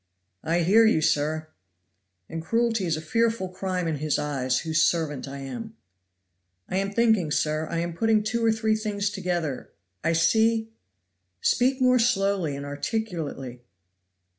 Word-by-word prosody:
"I 170 Hz, +2 st, +1 dB
hear 205 Hz, +7 st, +5 dB
you, 220 Hz, -7 st, +4 dB
sir. 155 Hz, 0 st, 0 dB, 0.8 s
"And 165 Hz, -, -5 dB
cruelty 225 Hz, +1 st, 0 dB
is 160 Hz, -2 st, 0 dB
a -, -, -5 dB
fearful 230 Hz, +2 st, 0 dB
crime 185 Hz, -1 st, -3 dB
in 160 Hz, -2 st, -1 dB
His 150 Hz, 0 st, 0 dB
eyes, 135 Hz, -4 st, -1 dB
whose 160 Hz, 0 st, +1 dB
servant 155 Hz, -5 st, 0 dB
I 140 Hz, +1 st, -7 dB
am." 220 Hz, -, -7 dB, 0.9 s
"I 185 Hz, -, -2 dB
am 195 Hz, +1 st, -1 dB
thinking, 220 Hz, -6 st, +2 dB
sir; 155 Hz, +1 st, 0 dB
I 170 Hz, -, -2 dB
am 170 Hz, 0 st, -3 dB
putting 220 Hz, +3 st, +2 dB
two 230 Hz, +2 st, -1 dB
or 225 Hz, -, +4 dB
three 220 Hz, 0 st, +1 dB
things 205 Hz, -2 st, -2 dB
together 175 Hz, -8 st, -3 dB, 0.3 s
I 165 Hz, -, +2 dB
see 220 Hz, +6 st, +2 dB, 0.4 s
" 90 Hz, 0 st, -51 dB
"Speak 260 Hz, +2 st, +1 dB
more 255 Hz, -1 st, +4 dB
slowly 195 Hz, -, +1 dB
and 140 Hz, 0 st, -6 dB
articulately." 145 Hz, -, -4 dB
180 Hz, 155 wpm, -26 LUFS, 155-220 Hz, 0.9 s, hear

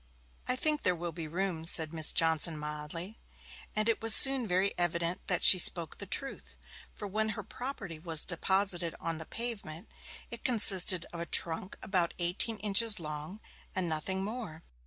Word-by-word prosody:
'I 250 Hz, -, -2 dB
think 300 Hz, +3 st, +1 dB
there 180 Hz, -, 0 dB
will 170 Hz, 0 st, -7 dB
be 160 Hz, 0 st, -9 dB
room,' 175 Hz, 0 st, -4 dB
said 160 Hz, -1 st, +5 dB
Miss 160 Hz, -1 st, +2 dB
Johnson 160 Hz, 0 st, +1 dB
mildly. 150 Hz, +6 st, -8 dB, 0.6 s
And 215 Hz, +1 st, -1 dB
it 230 Hz, -, -1 dB
was 225 Hz, -1 st, +8 dB
soon 265 Hz, -4 st, +5 dB
very 190 Hz, +2 st, -1 dB
evident 170 Hz, 0 st, -3 dB
that -, -, -1 dB
she 185 Hz, -, +9 dB
spoke 170 Hz, -2 st, +1 dB
the 200 Hz, -, -8 dB
truth; 270 Hz, +8 st, -6 dB, 0.3 s
for 205 Hz, -, -8 dB
when 215 Hz, +2 st, -2 dB
her -, -, -7 dB
property 205 Hz, -, -9 dB
was 160 Hz, -1 st, +1 dB
deposited 180 Hz, -1 st, +2 dB
on 165 Hz, -1 st, -6 dB
the 160 Hz, -, -11 dB
pavement, 200 Hz, -9 st, -7 dB, 0.4 s
it 235 Hz, -, -7 dB
consisted 195 Hz, -7 st, +4 dB
of 170 Hz, -, -9 dB
a 170 Hz, -, -7 dB
trunk 170 Hz, +3 st, -3 dB
about 180 Hz, -4 st, -2 dB
eighteen 180 Hz, +6 st, -2 dB
inches 210 Hz, +1 st, +3 dB
long, 155 Hz, +6 st, -8 dB, 0.3 s
and 185 Hz, -2 st, -2 dB
nothing 180 Hz, +4 st, -3 dB
more. 205 Hz, -7 st, -8 dB
180 Hz, 170 wpm, -28 LUFS, 165-215 Hz, 0.6 s, she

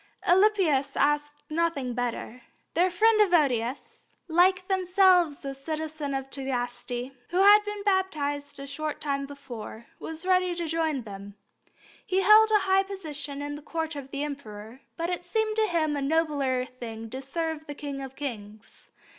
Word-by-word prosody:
Alypius 350 Hz, -8 st, +3 dB
asked 295 Hz, 0 st, +1 dB
nothing 305 Hz, -6 st, -1 dB
better. 245 Hz, 0 st, -4 dB, 0.3 s
Their 355 Hz, +3 st, +3 dB
friend 430 Hz, +4 st, +4 dB
Evodius, 280 Hz, -, +1 dB, 0.2 s
like 365 Hz, +2 st, +3 dB
themselves 365 Hz, -5 st, +3 dB
a 275 Hz, -, -3 dB
citizen 305 Hz, 0 st, -4 dB
of 270 Hz, 0 st, -3 dB
Tagaste, 245 Hz, -1 st, -3 dB, 0.2 s
who 350 Hz, -, -2 dB
had 405 Hz, +2 st, +8 dB
been 415 Hz, -1 st, -5 dB
baptized 290 Hz, -8 st, -1 dB
a 275 Hz, -, -6 dB
short 300 Hz, +2 st, -4 dB
time 275 Hz, -1 st, -2 dB
before, 240 Hz, -5 st, -9 dB
was 320 Hz, +2 st, -7 dB
ready 365 Hz, -1 st, +2 dB
to 340 Hz, 0 st, -3 dB
join 315 Hz, -4 st, -1 dB
them. 200 Hz, -1 st, -9 dB, 0.7 s
He 380 Hz, +1 st, +1 dB
held 430 Hz, +2 st, +7 dB
a 425 Hz, -1 st, +4 dB
high 385 Hz, 0 st, +4 dB
position 305 Hz, -7 st, -6 dB
at 290 Hz, 0 st, -4 dB
the 295 Hz, -, -9 dB
Court 320 Hz, +1 st, -3 dB
of 275 Hz, -2 st, -7 dB
the 280 Hz, +1 st, -3 dB
Emperor, 245 Hz, -4 st, -7 dB, 0.2 s
but 335 Hz, +1 st, -2 dB
it 355 Hz, 0 st, -3 dB
seemed 435 Hz, +4 st, -1 dB
to 435 Hz, -1 st, +3 dB
him 315 Hz, -5 st, 0 dB
a 285 Hz, -, -2 dB
nobler 280 Hz, -4 st, +1 dB
thing 225 Hz, -3 st, -8 dB
to 260 Hz, -, -5 dB
serve 320 Hz, +2 st, -4 dB
the 290 Hz, -, -6 dB
King 280 Hz, -1 st, -5 dB
of 270 Hz, -1 st, -8 dB
kings. 215 Hz, -7 st, -8 dB
295 Hz, 160 wpm, -27 LUFS, 270-355 Hz, 0.7 s, had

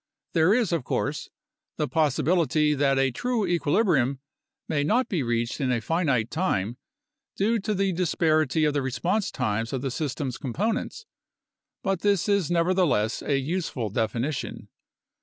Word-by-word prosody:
There 165 Hz, +2 st, +4 dB
is, 235 Hz, -7 st, +1 dB
of 165 Hz, -6 st, 0 dB
course, 145 Hz, +4 st, -2 dB, 0.5 s
the 150 Hz, -, 0 dB
possibility 155 Hz, 0 st, +2 dB
that 140 Hz, -1 st, +2 dB
a 135 Hz, 0 st, +2 dB
true 235 Hz, -, -1 dB
equilibrium 155 Hz, -, +2 dB, 0.5 s
may 145 Hz, -2 st, 0 dB
not 240 Hz, -, +2 dB
be 180 Hz, -7 st, 0 dB
reached 120 Hz, +1 st, -1 dB
in 130 Hz, -2 st, +1 dB
a 120 Hz, -, +1 dB
finite 130 Hz, -6 st, 0 dB
time 120 Hz, -, -1 dB, 0.6 s
due 225 Hz, +4 st, +1 dB
to 210 Hz, +1 st, -2 dB
the 195 Hz, 0 st, +1 dB
disparity 155 Hz, -3 st, +2 dB
of 150 Hz, -, +1 dB
the 145 Hz, -, 0 dB
response 175 Hz, -, -1 dB
times 115 Hz, +3 st, -2 dB
of 130 Hz, -1 st, -2 dB
the 135 Hz, -, -1 dB
system's 130 Hz, -2 st, -3 dB
components, 215 Hz, -, -2 dB, 0.8 s
but 195 Hz, -2 st, 0 dB
this 200 Hz, -3 st, +2 dB
is 200 Hz, -5 st, +2 dB
neverthe 175 Hz, +1 st, +2 dB
less 110 Hz, 0 st, 0 dB
a 140 Hz, -, 0 dB
useful 135 Hz, -, -2 dB
definition. 120 Hz, +6 st, -2 dB
155 Hz, 150 wpm, -26 LUFS, 130-185 Hz, 0.8 s, There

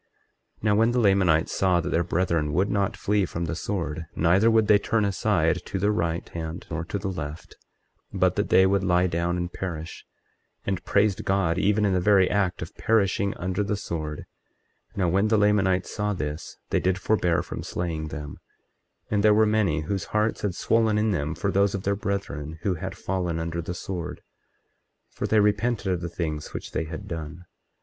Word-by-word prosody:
24:23 -, -, -25 dB
Now 105 Hz, -1 st, +3 dB
when 115 Hz, +2 st, +4 dB
the 125 Hz, -, +2 dB
Lamanites 95 Hz, -7 st, +3 dB
saw 90 Hz, -2 st, +2 dB
that -, -, -3 dB
their 85 Hz, -, +2 dB
brethren 85 Hz, -3 st, 0 dB
would 95 Hz, +6 st, +1 dB
not 100 Hz, -2 st, 0 dB
flee 105 Hz, 0 st, +1 dB
from 85 Hz, -1 st, -3 dB
the 85 Hz, -, -3 dB
sword, 80 Hz, -4 st, -3 dB
neither 90 Hz, +7 st, +4 dB
would 110 Hz, -1 st, +4 dB
they 105 Hz, 0 st, +5 dB
turn 110 Hz, +1 st, +1 dB
aside 90 Hz, -4 st, +1 dB
to -, -, -3 dB
the 100 Hz, +3 st, +2 dB
right 85 Hz, -4 st, -1 dB
hand 80 Hz, 0 st, -6 dB
or 80 Hz, +1 st, -2 dB
to 100 Hz, -, -3 dB
the 95 Hz, 0 st, -4 dB
left, 80 Hz, -4 st, -6 dB, 0.6 s
but -, -, +2 dB
that -, -, -1 dB
they 95 Hz, -, +6 dB
would 95 Hz, 0 st, +2 dB
lie 90 Hz, -1 st, +3 dB
down 85 Hz, 0 st, 0 dB
and 90 Hz, 0 st, -3 dB
perish, 85 Hz, -3 st, -6 dB, 0.6 s
and 95 Hz, -2 st, -2 dB
praised 100 Hz, -1 st, +2 dB
God 95 Hz, -3 st, +1 dB
even 105 Hz, +2 st, +2 dB
in 100 Hz, -, +2 dB
the 90 Hz, -, +2 dB
very 95 Hz, -1 st, +5 dB
act 95 Hz, -4 st, 0 dB
of 80 Hz, -, -10 dB
perishing 100 Hz, -3 st, +1 dB
under 95 Hz, +3 st, -1 dB
the 105 Hz, 0 st, -1 dB
sword— 80 Hz, -5 st, -5 dB, 0.7 s
24:24 -, -, -16 dB
Now 90 Hz, -3 st, +2 dB
when 100 Hz, +5 st, +2 dB
the 110 Hz, 0 st, +3 dB
Lamanites 95 Hz, -3 st, +2 dB
saw 105 Hz, -1 st, 0 dB
this 75 Hz, -2 st, -5 dB
they -, -, +3 dB
did 95 Hz, 0 st, +1 dB
forbear 90 Hz, -4 st, +1 dB
from -, -, -6 dB
slaying 80 Hz, -3 st, -3 dB
them; 75 Hz, -1 st, -7 dB, 0.7 s
and 105 Hz, -1 st, +2 dB
there 105 Hz, -1 st, +6 dB
were 110 Hz, +1 st, +5 dB
many 105 Hz, -8 st, +1 dB
whose 95 Hz, +4 st, -3 dB
hearts 105 Hz, +1 st, 0 dB
had 100 Hz, -4 st, -1 dB
swollen 110 Hz, 0 st, +2 dB
in 105 Hz, 0 st, +2 dB
them 80 Hz, -3 st, -1 dB
for 100 Hz, +4 st, -1 dB
those 100 Hz, +1 st, +2 dB
of 95 Hz, -, -4 dB
their 100 Hz, 0 st, +1 dB
brethren 95 Hz, -7 st, -4 dB
who 100 Hz, -, +1 dB
had 95 Hz, +2 st, -6 dB
fallen 90 Hz, -4 st, -2 dB
under 85 Hz, +1 st, -3 dB
the 85 Hz, +2 st, -5 dB
sword, 90 Hz, -1 st, -5 dB, 0.9 s
for -, -, -3 dB
they 110 Hz, -, +3 dB
repented 105 Hz, -1 st, +1 dB
of 90 Hz, -, -3 dB
the 85 Hz, -, -4 dB
things 80 Hz, -3 st, -4 dB
which -, -, -6 dB
they 80 Hz, -, -2 dB
had 85 Hz, +6 st, -7 dB
done. 85 Hz, 0 st, -6 dB
95 Hz, 200 wpm, -25 LUFS, 85-100 Hz, 0.9 s, they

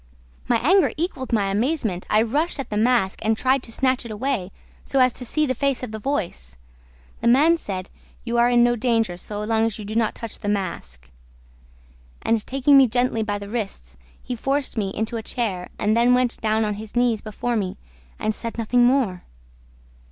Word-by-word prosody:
"My 240 Hz, -, +3 dB
anger 380 Hz, +1 st, +5 dB
equaled 300 Hz, -6 st, -3 dB
my 200 Hz, -4 st, +1 dB
amazement. 220 Hz, -, -1 dB
I 215 Hz, +1 st, +4 dB
rushed 295 Hz, +8 st, -1 dB
at 275 Hz, -, -5 dB
the -, -, -2 dB
mask 220 Hz, -3 st, +2 dB
and 220 Hz, 0 st, +1 dB
tried 260 Hz, +2 st, +2 dB
to 230 Hz, -, -9 dB
snatch 260 Hz, +2 st, +1 dB
it 235 Hz, -, -8 dB
away, 215 Hz, -3 st, -2 dB, 0.3 s
so 275 Hz, -, -2 dB
as 255 Hz, -2 st, +5 dB
to 250 Hz, -, -5 dB
see 305 Hz, +6 st, +1 dB
the 260 Hz, -, 0 dB
face 275 Hz, 0 st, -1 dB
of 245 Hz, -, -5 dB
the 220 Hz, -, -5 dB
voice. 175 Hz, -, -3 dB, 0.6 s
The 235 Hz, -, -1 dB
man 290 Hz, +8 st, +5 dB
said, 190 Hz, -, -6 dB, 0.3 s
'You 235 Hz, 0 st, 0 dB
are 240 Hz, +1 st, +5 dB
in 240 Hz, -1 st, +5 dB
no 240 Hz, 0 st, +3 dB
danger, 225 Hz, -5 st, +1 dB
so 205 Hz, +4 st, -6 dB
long 220 Hz, +1 st, +1 dB
as 225 Hz, -2 st, -1 dB
you 210 Hz, -, -7 dB
do 210 Hz, -, -5 dB
not 225 Hz, -1 st, +1 dB
touch 230 Hz, -2 st, -8 dB
the 205 Hz, -, -3 dB
mask.' 65 Hz, -, -4 dB, 1.1 s
And, 225 Hz, -2 st, +1 dB
taking 275 Hz, +1 st, +5 dB
me 265 Hz, -, +6 dB
gently 245 Hz, -1 st, 0 dB
by 205 Hz, -1 st, -1 dB
the 200 Hz, 0 st, -8 dB
wrists, 195 Hz, -, -5 dB, 0.3 s
he 250 Hz, -, -4 dB
forced 270 Hz, +4 st, -1 dB
me 205 Hz, -4 st, -1 dB
into 220 Hz, +4 st, -3 dB
a -, -, -3 dB
chair 210 Hz, -6 st, -3 dB
and 215 Hz, +1 st, +1 dB
then 240 Hz, +2 st, +4 dB
went 250 Hz, -1 st, 0 dB
down 220 Hz, 0 st, +1 dB
on 210 Hz, -, -1 dB
his 220 Hz, +1 st, -11 dB
knees 240 Hz, -3 st, +2 dB
before 230 Hz, +3 st, -3 dB
me 200 Hz, -2 st, -2 dB, 0.4 s
and 215 Hz, 0 st, -1 dB
said 230 Hz, +1 st, -6 dB
nothing 240 Hz, +2 st, +2 dB
more! 240 Hz, -8 st, +2 dB
230 Hz, 205 wpm, -23 LUFS, 210-255 Hz, 1.1 s, me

